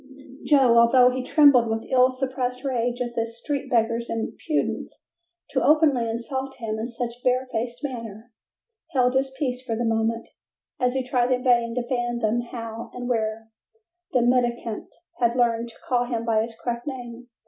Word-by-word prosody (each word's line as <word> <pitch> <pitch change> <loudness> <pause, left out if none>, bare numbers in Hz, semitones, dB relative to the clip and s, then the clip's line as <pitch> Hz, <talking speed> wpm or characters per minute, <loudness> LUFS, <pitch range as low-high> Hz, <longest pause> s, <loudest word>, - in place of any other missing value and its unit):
Joe, 260 -5 +5
although 250 +2 +6
he 255 +1 -2
trembled 270 -4 +5
with 225 0 -2
ill 255 0 +5
suppressed 255 -1 -3
rage 245 -2 -1
at 240 -1 -2
this 230 0 -3
street 280 0 -3
beggar's 230 -1 +1
impudence 230 +7 -3 0.5
to - - +1
openly 290 -7 +4
insult 265 +4 -4
him 220 -3 -4
in 230 +2 -3
such 240 0 -5
barefaced 250 -1 -1
manner, 230 -4 -6 0.6
held 250 -2 +3
his 265 +1 +1
peace 255 -3 -2
for 230 -3 -2
the 235 +1 -1
moment, 225 0 0 0.5
as 250 0 +1
he 265 - 0
tried 250 -1 +1
in 250 0 +1
vain 235 -2 +2
to 245 -1 -2
fathom 240 -2 0
how 230 -1 -6
and 245 0 -5
where 220 -1 -2 0.6
the 250 -2 +3
mendicant 240 -2 0 0.3
had 235 0 +2
learned 235 -1 +1
to 230 - -16
call 245 -1 +2
him 235 -2 -3
by 220 -2 +2
his 225 0 -5
correct 240 +2 -3
name. 245 -2 -7
240 Hz, 165 wpm, -24 LUFS, 230-255 Hz, 0.6 s, although